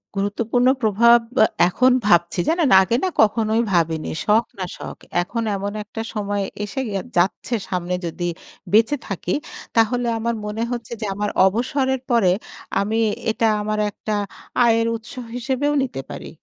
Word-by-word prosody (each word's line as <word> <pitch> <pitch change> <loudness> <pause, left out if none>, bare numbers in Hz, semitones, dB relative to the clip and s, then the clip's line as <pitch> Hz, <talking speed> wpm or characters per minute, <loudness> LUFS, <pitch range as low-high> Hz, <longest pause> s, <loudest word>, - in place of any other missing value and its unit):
গুরুত্বপূর্ণ 225 +5 0
প্রভাব 230 +2 +5 0.2
বা 220 - +7 0.2
এখন 255 +7 +3
ভাবছি। 175 -3 +3
জানেন? 330 -3 +2
আগে 190 +5 +1
না 375 - +2
কখনোই 220 +1 +2
ভাবিনি। 165 -3 +1 0.2
শখ 220 +3 +4
না 185 - -2
শখ। - - -8 0.2
এখন 230 +6 -3
এমন 200 +1 -3
একটা 225 +2 -7
সময় 205 -1 -2 0.2
এসে 205 +5 -4
গে - - -5 0.2
যাচ্ছে 185 +7 +1 0.2
সামনে 180 -1 -2
যদি 170 +1 -4 0.5
বেঁচে 225 +6 +5
থাকি, 185 -2 -3 0.4
তাহলে 240 +2 +2
আমার 235 +1 -1
মনে 210 +2 -3
হচ্ছে 240 -2 -5
যে - - -1
আমার 205 +1 -1 0.2
অবসরের 260 +5 0
পরে 220 -7 +4 0.5
আমি 210 +3 0 0.3
এটা 225 - 0 0.2
আমার 215 0 -2
একটা 215 +1 -5 0.5
আয়ের 230 0 +3
উৎস 225 +1 -9 0.2
হিসেবেও 265 +4 0
নিতে 250 - -4
পারি। - - -7
220 Hz, 150 wpm, -21 LUFS, 200-235 Hz, 0.5 s, বা